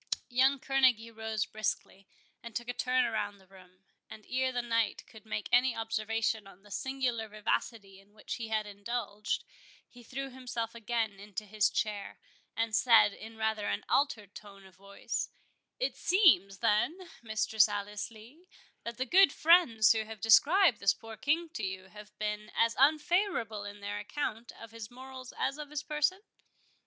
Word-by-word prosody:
Young 260 Hz, +3 st, +4 dB
Kerneguy 255 Hz, -4 st, +2 dB
rose 220 Hz, -2 st, -2 dB
briskly, 195 Hz, -2 st, -4 dB, 0.3 s
and 235 Hz, -2 st, -10 dB
took 240 Hz, -1 st, -3 dB
a 245 Hz, -, -2 dB
turn 255 Hz, +1 st, +2 dB
through 205 Hz, -2 st, -2 dB
the 190 Hz, -, -21 dB
room; 185 Hz, -1 st, -19 dB, 0.3 s
and 215 Hz, -, -11 dB
ere 260 Hz, 0 st, 0 dB
the 245 Hz, -1 st, -2 dB
knight 230 Hz, -3 st, 0 dB
could 220 Hz, -1 st, -16 dB
make 210 Hz, -1 st, -3 dB
any 250 Hz, 0 st, +4 dB
observation 225 Hz, -1 st, -1 dB
on 195 Hz, 0 st, -16 dB
the 205 Hz, -, -17 dB
singular 255 Hz, -3 st, -2 dB
vivacity 210 Hz, -1 st, -3 dB
in 200 Hz, +2 st, -23 dB
which 210 Hz, -, -6 dB
he 230 Hz, -2 st, -5 dB
had 215 Hz, -1 st, -1 dB
indulged, 205 Hz, 0 st, -3 dB, 0.4 s
he 245 Hz, -, -16 dB
threw 270 Hz, +3 st, -6 dB
himself 245 Hz, -3 st, -4 dB
again 225 Hz, -3 st, -2 dB
into 205 Hz, +1 st, -7 dB
his 210 Hz, 0 st, +2 dB
chair, 210 Hz, -2 st, -3 dB, 0.4 s
and 225 Hz, -1 st, 0 dB
said, 225 Hz, -2 st, +6 dB
in 225 Hz, +2 st, -11 dB
rather 220 Hz, -1 st, -1 dB
an 100 Hz, -, -2 dB
altered 225 Hz, -8 st, 0 dB
tone 200 Hz, -2 st, -12 dB
of 190 Hz, -, -16 dB
voice—"It 200 Hz, -, -6 dB
seems, 300 Hz, -, +4 dB
then, 325 Hz, -, +1 dB
Mistress 220 Hz, -1 st, +2 dB
Alice 205 Hz, 0 st, -4 dB
Lee, 235 Hz, +11 st, -16 dB, 0.4 s
that 235 Hz, 0 st, -6 dB
the 260 Hz, -, -1 dB
good 370 Hz, +3 st, +6 dB
friends 305 Hz, -12 st, +5 dB
who 220 Hz, -1 st, +2 dB
have 220 Hz, -1 st, -9 dB
described 285 Hz, -, +5 dB
this 200 Hz, -, +3 dB
poor 225 Hz, 0 st, -10 dB
King 310 Hz, +7 st, 0 dB
to 240 Hz, -9 st, -6 dB
you, 190 Hz, 0 st, -4 dB
have 210 Hz, +1 st, -13 dB
been 210 Hz, 0 st, -3 dB
as 230 Hz, 0 st, +2 dB
unfavourable 300 Hz, -, +2 dB
in 205 Hz, 0 st, -9 dB
their 205 Hz, 0 st, -4 dB
account 230 Hz, +1 st, -4 dB
of 230 Hz, -1 st, -11 dB
his 225 Hz, -1 st, -8 dB
morals 260 Hz, 0 st, -10 dB
as 275 Hz, +3 st, -1 dB
of 295 Hz, -1 st, -6 dB
his 300 Hz, 0 st, -4 dB
person?" 300 Hz, +6 st, 0 dB
225 Hz, 170 wpm, -31 LUFS, 210-255 Hz, 0.4 s, said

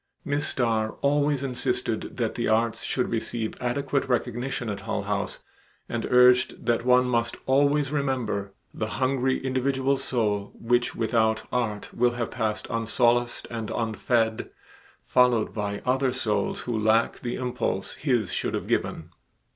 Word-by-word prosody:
Miss 145 Hz, 0 st, 0 dB
Starr 110 Hz, -3 st, 0 dB
always 145 Hz, -1 st, +2 dB
insisted 130 Hz, -2 st, -2 dB
that -, -, 0 dB
the -, -, -2 dB
arts 115 Hz, +1 st, +1 dB
should 125 Hz, -, -1 dB
receive 115 Hz, -1 st, -2 dB
adequate 140 Hz, +3 st, 0 dB
recognition 125 Hz, 0 st, -1 dB
at 100 Hz, -2 st, -3 dB
Hull -, -, -2 dB
House -, -, -3 dB, 0.4 s
and -, -, -3 dB
urged 125 Hz, 0 st, +4 dB
that 115 Hz, -1 st, +1 dB
one 125 Hz, 0 st, +5 dB
must 120 Hz, -2 st, 0 dB
always 140 Hz, +1 st, +3 dB
remember 130 Hz, -8 st, -1 dB, 0.2 s
"the 110 Hz, -, -3 dB
hungry 130 Hz, 0 st, +1 dB
individual 135 Hz, +1 st, +1 dB
soul 105 Hz, -6 st, -1 dB
which 120 Hz, +1 st, +1 dB
without 110 Hz, -1 st, +1 dB
art 110 Hz, -4 st, -2 dB
will 120 Hz, 0 st, +2 dB
have 120 Hz, -1 st, -3 dB
passed 110 Hz, -3 st, -2 dB
unsolaced 120 Hz, +1 st, +1 dB
and 115 Hz, -2 st, -4 dB
unfed, 110 Hz, 0 st, 0 dB, 0.6 s
followed 125 Hz, -3 st, +3 dB
by 100 Hz, -2 st, -3 dB
other 130 Hz, +1 st, +2 dB
souls 110 Hz, -6 st, -1 dB
who 120 Hz, -, -3 dB
lack 110 Hz, +1 st, +2 dB
the 120 Hz, 0 st, -3 dB
impulse 125 Hz, -6 st, -2 dB
his 125 Hz, -8 st, 0 dB
should -, -, -1 dB
have -, -, -3 dB
given." 80 Hz, +1 st, -2 dB
120 Hz, 140 wpm, -26 LUFS, 110-130 Hz, 0.6 s, one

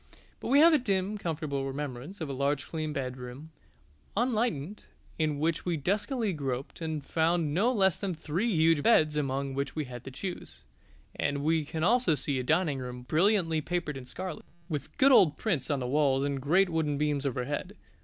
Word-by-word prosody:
But -, -, -6 dB
we 280 Hz, +4 st, +5 dB
have 335 Hz, +1 st, +7 dB
a 305 Hz, -, +5 dB
dim, 200 Hz, -3 st, -1 dB
comfortable 150 Hz, -6 st, -2 dB
remembrance 140 Hz, +6 st, -6 dB
of 160 Hz, -, -2 dB
a 140 Hz, -, -4 dB
large 140 Hz, +1 st, 0 dB
clean 155 Hz, -2 st, -3 dB
bedroom, 130 Hz, +2 st, -6 dB, 0.7 s
unlighted, 215 Hz, -, -1 dB, 0.3 s
in 155 Hz, -2 st, +1 dB
which 160 Hz, +2 st, 0 dB
we 175 Hz, -2 st, -1 dB
duskily 205 Hz, -, -1 dB
groped 135 Hz, -1 st, -4 dB
and 155 Hz, -3 st, -3 dB
found 165 Hz, -2 st, +1 dB
no 210 Hz, +9 st, +3 dB
less 190 Hz, -7 st, +3 dB
than 190 Hz, -4 st, -3 dB
three 165 Hz, +9 st, -1 dB
huge 160 Hz, -3 st, +4 dB
beds 155 Hz, -6 st, +4 dB
among 135 Hz, -1 st, -1 dB
which 140 Hz, +1 st, -3 dB
we 155 Hz, -2 st, -2 dB
had 125 Hz, -1 st, -9 dB
to -, -, -5 dB
choose; 180 Hz, +7 st, -7 dB, 0.5 s
and 140 Hz, 0 st, -1 dB
we 160 Hz, +1 st, +2 dB
can 160 Hz, +2 st, -4 dB
see -, -, +4 dB
also 240 Hz, -6 st, +3 dB, 0.2 s
a 130 Hz, -2 st, 0 dB
dining 155 Hz, +1 st, +1 dB
room 125 Hz, -1 st, -6 dB
brilliantly 165 Hz, -, +2 dB
papered 170 Hz, -2 st, -2 dB
in 130 Hz, -2 st, -8 dB
scarlet, 185 Hz, +5 st, -6 dB, 0.2 s
with 150 Hz, -5 st, -5 dB
good 275 Hz, 0 st, +6 dB
old 175 Hz, -, +6 dB
prints 165 Hz, -, -1 dB
on 145 Hz, -, +1 dB
the 130 Hz, -, -3 dB
walls 135 Hz, 0 st, +2 dB
and 140 Hz, -1 st, -2 dB
great 180 Hz, +7 st, +3 dB
wooden 160 Hz, -3 st, 0 dB
beams 145 Hz, -1 st, 0 dB
overhead. 145 Hz, -, -3 dB
155 Hz, 185 wpm, -29 LUFS, 140-185 Hz, 0.7 s, have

